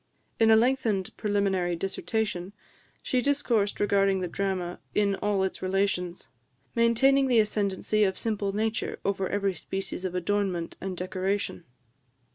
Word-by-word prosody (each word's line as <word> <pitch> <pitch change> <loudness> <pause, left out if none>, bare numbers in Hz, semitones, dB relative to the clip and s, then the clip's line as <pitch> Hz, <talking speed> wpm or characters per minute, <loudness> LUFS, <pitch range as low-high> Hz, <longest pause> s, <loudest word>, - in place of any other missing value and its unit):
In 225 -1 +5
a 220 - +8
lengthened 225 -5 +1
preliminary 195 -4 0
dissertation, 195 +1 -2 0.5
she 255 - +1
discoursed 240 -7 +1
regarding 195 -1 +3
the 180 - -2
drama 185 -1 -2 0.2
in 205 -1 +3
all 205 -2 +1
its 190 - -3
relations, 185 -2 -1 0.5
maintaining 265 +4 +4
the 245 -2 +3
ascendency 210 -1 +1
of 190 -2 +1
simple 210 -3 -1
nature 220 +3 -1
over 195 -1 0
every 200 -1 0
species 190 +2 -5
of 185 -1 -3
adornment 180 -2 -1
and 190 -1 -4
decoration. 185 0 -2
200 Hz, 130 wpm, -27 LUFS, 190-220 Hz, 0.5 s, a